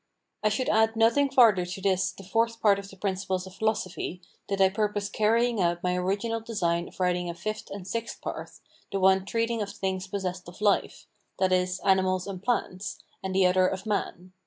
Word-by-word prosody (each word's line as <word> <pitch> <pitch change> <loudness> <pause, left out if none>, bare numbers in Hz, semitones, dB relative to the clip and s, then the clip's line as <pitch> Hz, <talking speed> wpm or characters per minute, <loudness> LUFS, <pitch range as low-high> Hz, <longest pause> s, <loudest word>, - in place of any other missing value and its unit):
I 215 - +3
should 220 +5 -1
add 220 +1 +3
nothing 230 +6 +4
farther 230 -8 +5
to 180 +2 -6
this 190 -1 +1
the 195 - -13
Fourth 230 +4 0
Part 200 -2 +4
of 195 0 -9
the 195 - -14
Principles 190 -1 -2
of 190 - -11
Philosophy, 195 -4 -2 0.3
did 195 -1 -2
I 190 -1 +6
purpose 205 0 -1
carrying 225 +1 +2
out 175 0 0
my 180 0 +1
original 200 +5 -1
design 175 -7 -1
of - - -16
writing 180 -1 +1
a 170 - -5
Fifth 215 +4 -5
and 195 -2 -7
Sixth 230 +3 -4
Part, - - -5 0.4
the 195 - -1
one 190 0 +4
treating 230 0 0
of 205 - -3
things 190 -2 -3
possessed 185 -2 -4
of 175 - -14
life, 210 -1 +1 0.3
that 190 -1 +2
is, 180 0 +1
animals 185 -1 +3
and 190 -2 -6
plants, 205 -4 -2 0.2
and 190 0 -4
the 190 -1 +5
other 185 0 +4
of 190 0 -4
man. 185 -3 -3
195 Hz, 200 wpm, -27 LUFS, 185-215 Hz, 0.4 s, I